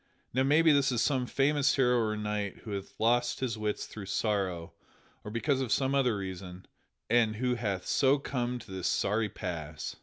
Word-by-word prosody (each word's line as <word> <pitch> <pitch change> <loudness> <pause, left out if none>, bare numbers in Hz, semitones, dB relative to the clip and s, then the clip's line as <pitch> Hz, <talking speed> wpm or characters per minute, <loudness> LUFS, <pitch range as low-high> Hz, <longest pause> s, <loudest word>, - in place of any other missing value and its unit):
Now 130 - +2
maybe 155 +4 +5
this 140 -2 +3
is 120 - 0
some 130 -1 +1
famous 140 +2 +2
hero 125 -2 +3
or 110 -2 0
knight 105 -2 -3
who 110 - -7
hath 100 -1 -6
lost 120 +2 +2
his 125 -4 -1
wits 105 -1 -2
through 100 -3 -9
sorrow 95 -5 -1 0.5
or - - -6
because 130 +5 0
of 125 -4 -3
some 135 0 +2
other 125 -6 +2
reason, 95 -1 -7 0.4
and 115 -2 +3
who 125 +2 0
hath 100 -6 -2
so 135 +1 +3
come 125 -3 -2
to 110 - -12
this 95 -2 -2
sorry 105 +1 +1
pass." 80 -6 -5
115 Hz, 185 wpm, -30 LUFS, 100-130 Hz, 0.5 s, maybe